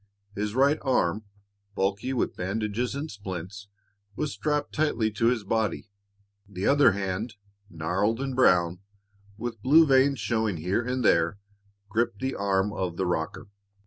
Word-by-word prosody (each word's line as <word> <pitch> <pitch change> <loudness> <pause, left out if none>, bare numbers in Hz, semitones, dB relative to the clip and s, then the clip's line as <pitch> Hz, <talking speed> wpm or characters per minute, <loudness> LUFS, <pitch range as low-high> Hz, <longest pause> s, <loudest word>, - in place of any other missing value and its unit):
His 105 +1 -3
right 140 +4 +3
arm, 110 -6 +1 0.5
bulky 100 +6 -1
with 130 - -1
bandages 105 +6 -2
and 145 +3 -4
splints, 100 0 -7 0.5
was 150 +3 -2
strapped 150 -1 -2
tightly 120 -8 +1
to 110 +2 +1
his 120 -3 +1
body; 110 0 -1 0.6
the 95 0 -4
other 145 -7 +5
hand, 100 +3 -3 0.3
gnarled 95 +7 -1
and 135 -1 -3
brown, 90 -8 +3 0.6
with 115 -1 -5
blue 155 +7 +6
veins 135 -1 +4
showing 110 -2 0
here 90 +8 0
and 125 0 -2
there, 85 +2 +3 0.5
gripped 115 +2 0
the 130 +1 -2
arm 100 0 0
of 90 -4 -3
the 95 - 0
rocker. 90 +5 -3
105 Hz, 145 wpm, -27 LUFS, 95-130 Hz, 0.6 s, blue